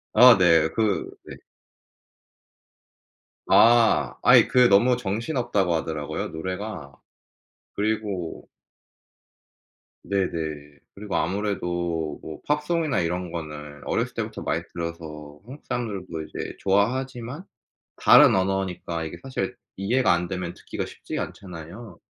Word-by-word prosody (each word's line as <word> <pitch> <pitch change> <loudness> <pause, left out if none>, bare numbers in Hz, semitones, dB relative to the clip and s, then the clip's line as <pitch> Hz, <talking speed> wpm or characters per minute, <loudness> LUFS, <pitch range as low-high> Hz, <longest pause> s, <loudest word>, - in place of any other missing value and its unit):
아 125 0 +9
네. 85 -4 +4
그 110 - 0 0.2
네. - - -9 2.1
아. 115 -1 +5
아이 - - +7
그 125 -1 +5
너무 120 +6 +5
정신없다고 110 - -1
하더라고요 80 -2 -3
노래가. 95 -2 -6 0.8
그리고 105 -5 -3 1.5
네네. 80 -7 -3 0.2
그리고 105 0 -5
아무래도 85 -5 -2
뭐 80 - -9
팝송이나 150 0 0
이런 90 +1 -2
거는 75 -3 -7
어렸을 - - -1
때부터 - - -4
많이 - - -1
들어서 80 -3 -7
한국 135 +5 -12
사람들도 100 -9 -4
이제 - - -6
좋아하지만 125 - -1 0.5
다른 - - +7
언어니까 95 -3 -1
이게 80 - -6
사실 130 -8 -4 0.2
이해가 115 +6 +2
안 85 0 -1
되면 90 -1 -4
듣기가 - - -6
쉽지가 - - -5
않잖아요. 90 +2 -10
95 Hz, 255 characters per minute, -25 LUFS, 85-115 Hz, 2.1 s, 아